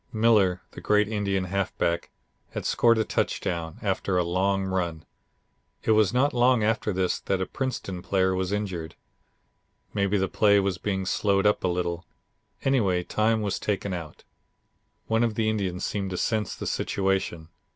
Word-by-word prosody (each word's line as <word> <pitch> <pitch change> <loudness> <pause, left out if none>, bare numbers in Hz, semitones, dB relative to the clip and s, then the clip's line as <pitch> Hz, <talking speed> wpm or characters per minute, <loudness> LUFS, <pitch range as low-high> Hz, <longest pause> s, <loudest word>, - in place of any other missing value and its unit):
Miller, 110 -5 +3
the - - -10
great 105 0 +3
Indian 100 -3 -1
halfback, 90 -2 -1 0.4
had - - -4
scored 115 -1 +4
a 110 - +2
touchdown, 85 -5 -2
after 95 -1 0
a 90 - +3
long 95 +3 +1
run. 85 -4 -2 0.8
It - - +2
was 110 -3 +4
not 140 +4 +2
long 125 -1 +4
after 110 0 +1
this 90 -1 0
that 95 - -1
a 95 - 0
Princeton 100 -9 -4
player 95 0 +1
was 95 0 -1
injured. 95 -6 -3 1.0
Maybe 100 0 +1
the 95 0 +1
play 100 0 +4
was 95 -2 -1
being 95 -1 -2
slowed 100 +1 +1
up 105 - +3
a - - +2
little. 90 -1 -2 0.6
Anyway, 100 -10 +2
time 110 +3 +1
was 100 - -1
taken 100 -2 -2
out. 80 -4 -7 0.8
One 115 +1 +2
of 115 -2 0
the 110 -1 0
Indians 95 -4 -2
seemed 100 -2 -2
to 90 - -4
sense 110 +1 -1
the - - -6
situation. 95 -4 -1
100 Hz, 160 wpm, -26 LUFS, 90-105 Hz, 1.0 s, scored